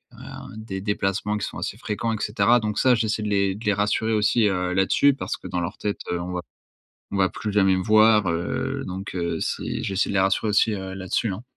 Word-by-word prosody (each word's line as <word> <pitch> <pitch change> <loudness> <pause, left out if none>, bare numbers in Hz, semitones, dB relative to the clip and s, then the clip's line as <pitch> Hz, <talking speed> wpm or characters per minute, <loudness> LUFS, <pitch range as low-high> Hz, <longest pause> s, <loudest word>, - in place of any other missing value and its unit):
heu, - - -10
des 100 -3 -6
déplacements 105 +1 -1
qui 105 - -3
sont - - -8
assez - - -4
fréquents 115 +2 -2
et 110 - -4
cetera. 120 +3 +3
Donc 105 -2 -3
ça, 130 -1 +5
j'essaie 110 -1 -1
de 105 - -2
les 100 -1 +1
de 105 - -10
les 105 - +3
rassurer 105 +2 0
aussi, 105 +1 +3
heu, 90 -1 -1
là-dessus, 95 +9 +4
parce 135 - -4
que - - -10
dans 90 - -2
leur 85 - -4
tête, 105 -1 -3
heu, 90 - -1
on 90 +1 -5
va 90 - -2 0.7
on 100 - -3
va 95 -1 +3
plus 105 - -4
jamais 95 -2 +4
me 95 - -1
voir, 110 -1 +5
heu, 85 +1 -2
donc 95 +2 -6
heu, 85 -2 -2
c'est - - -3
j'essaie 95 0 0
de - - -3
les 95 - +3
rassurer 95 +3 +1
aussi, 105 +1 +3
heu, 95 -1 -5
là-dessus 95 +3 -1
hein. 95 +5 -7
100 Hz, 240 wpm, -24 LUFS, 95-110 Hz, 0.7 s, ça